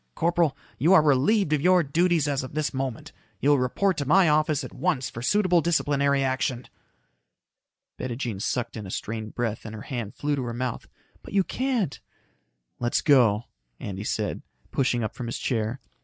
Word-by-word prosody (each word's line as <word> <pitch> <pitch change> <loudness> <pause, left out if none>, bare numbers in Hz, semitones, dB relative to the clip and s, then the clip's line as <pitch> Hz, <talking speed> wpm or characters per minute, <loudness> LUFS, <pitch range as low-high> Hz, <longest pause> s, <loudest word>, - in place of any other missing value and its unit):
Corporal. 170 -3 +1 0.2
You 165 +9 +4
are 160 - +7
relieved 155 +6 +3
of 150 - +1
your 180 +1 +5
duties 165 +1 +2
as 140 -2 0
of 130 +3 -8
this 155 -1 -1
moment. 130 -3 -4 0.3
You 145 - +3
will 145 - +4
report 175 +9 +1
to 145 - -2
my 185 +3 +5
office 155 -1 +2
at - - -8
once 135 -6 -1
for 115 - -7
suitable 180 +4 +3
disciplinary 140 -4 +2
action." 130 -2 -1 1.3
Bettijean 120 -4 -3
sucked 125 +2 -2
in 105 -3 -6
a - - -8
strained 110 +2 -5
breath 115 -3 -2
and 110 0 -7
her 110 - -8
hand 120 -6 -5
flew 145 0 -1
to 135 - -3
her 120 -1 -4
mouth. 125 -1 -3 0.3
"But - - -12
you 195 - +4
can't 250 - -1 0.4
" - - -50
"Let's 120 0 +1
go," 120 -7 +4 0.4
Andy 100 0 -5
said, - - -2 0.3
pushing 125 -3 +1
up 110 - -3
from 125 0 -6
his 115 - -3
chair. 115 0 -2
135 Hz, 185 wpm, -26 LUFS, 120-160 Hz, 1.3 s, are